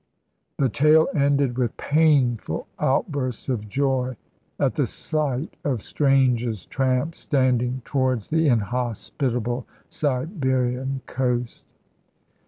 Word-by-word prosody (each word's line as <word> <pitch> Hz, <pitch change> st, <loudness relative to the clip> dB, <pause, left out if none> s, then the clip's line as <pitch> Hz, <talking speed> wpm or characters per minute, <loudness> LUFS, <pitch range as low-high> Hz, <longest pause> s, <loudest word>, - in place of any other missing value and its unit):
The 135 Hz, -, +3 dB
tale 155 Hz, +6 st, +4 dB
ended 140 Hz, -4 st, +2 dB
with 120 Hz, -3 st, -1 dB
painful 145 Hz, -7 st, +2 dB
outbursts 135 Hz, -, -1 dB
of 105 Hz, -5 st, -2 dB
joy 130 Hz, -1 st, 0 dB, 0.4 s
at -, -, +2 dB
the -, -, 0 dB
sight 150 Hz, -2 st, -2 dB
of 130 Hz, -7 st, -1 dB
Strange's 125 Hz, -, +1 dB
tramp 130 Hz, +4 st, 0 dB
standing 130 Hz, -3 st, 0 dB
towards 130 Hz, -4 st, -1 dB
the 160 Hz, 0 st, +3 dB
inhospitable 120 Hz, +1 st, -1 dB, 0.2 s
Siberian 130 Hz, -3 st, -1 dB
coast. 125 Hz, -2 st, -2 dB
130 Hz, 95 wpm, -24 LUFS, 125-140 Hz, 0.4 s, tale